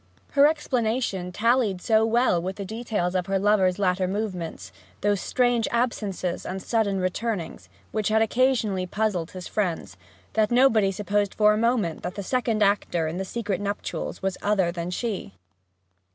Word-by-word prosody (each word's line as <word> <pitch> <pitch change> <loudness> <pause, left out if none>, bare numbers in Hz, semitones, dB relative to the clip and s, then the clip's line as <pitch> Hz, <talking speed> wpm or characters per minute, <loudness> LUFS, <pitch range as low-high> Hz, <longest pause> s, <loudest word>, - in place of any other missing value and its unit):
Her 285 0 +6
explanation 235 - -1
tallied 230 -1 +2
so 220 +3 +3
well 230 -6 +2
with 190 +2 -4
the 200 - -6
details 215 -4 -2
of 180 -1 -1
her 195 0 +1
lover's 195 -2 +3
latter 185 -2 +1
movements 180 - -4 0.3
those 205 -2 +1
strange 245 -2 +1
absences 210 -7 -1
and 190 +1 -4
sudden 205 -2 0
returnings, 185 - -3 0.2
which 215 -2 -1
had 220 +1 +3
occasionally 225 -6 +1
puzzled 190 -4 -1
his 185 -1 -8
friends 175 - -2 0.4
that 215 -1 +2
nobody 235 -5 +4
supposed 205 +1 -1
for 210 0 +5
a - - 0
moment 225 -8 +1
that 180 - -5
the 200 - -4
second 230 0 +1
actor 180 -5 +1
in 160 +3 -4
these 190 - -4
secret 205 -5 -2
nuptials 205 0 -4
was 190 -1 -1
other 195 -4 +2
than 170 0 -4
she. 190 - -3
205 Hz, 160 wpm, -25 LUFS, 185-225 Hz, 0.4 s, Her